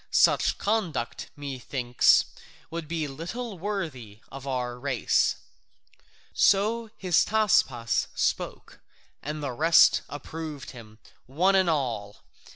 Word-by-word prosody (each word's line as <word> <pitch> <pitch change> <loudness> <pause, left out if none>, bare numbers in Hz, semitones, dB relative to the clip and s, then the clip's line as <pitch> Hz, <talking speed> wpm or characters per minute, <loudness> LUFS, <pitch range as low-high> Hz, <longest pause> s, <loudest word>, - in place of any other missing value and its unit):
Such - - +3
conduct, 175 - -2
methinks, 130 -3 +2 0.5
would 165 -1 -5
be 160 -1 -2
little 180 - -6
worthy 155 - -5
of 135 0 -9
our 125 -2 -3
race." 135 -3 +1 1.0
So 220 +3 +2
Hystaspas 180 - +2
spoke, - - -2 0.4
and 150 0 -5
the 140 - -2
rest 160 +7 +5
approved 150 0 -7
him, 110 -4 -13 0.3
one 175 +9 +2
and 190 -2 +3
all. 120 -9 -2
150 Hz, 100 wpm, -26 LUFS, 125-185 Hz, 1.0 s, rest